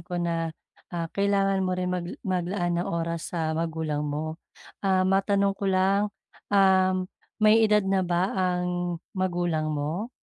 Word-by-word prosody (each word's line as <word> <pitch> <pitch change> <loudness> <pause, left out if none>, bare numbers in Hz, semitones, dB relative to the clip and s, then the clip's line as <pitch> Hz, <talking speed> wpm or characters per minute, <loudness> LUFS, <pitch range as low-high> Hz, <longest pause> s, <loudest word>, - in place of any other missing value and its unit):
ko 175 +1 -6
na, 170 -1 -1 0.4
ah, 170 -1 -3
kailangan 200 -1 +2
mo 185 -1 0
rin 180 0 -1
mag 175 -1 -3 0.2
maglaan 175 -1 0
ng - - -3
oras 170 +1 -3
sa 160 -1 0
magulang 160 -2 -2
mo. 150 +2 -3 0.4
Ah, 190 -1 +2
matanong 195 +1 +2
ko 195 0 -3
lang, 195 +2 +2 0.4
um, 190 -2 +4 0.3
may 215 +1 +5
edad 210 -2 +4
na 195 0 +2
ba 180 +1 0
ang 180 -1 -1 0.2
magulang 175 -4 -1
mo? 155 +8 -2
180 Hz, 145 wpm, -26 LUFS, 170-195 Hz, 0.4 s, may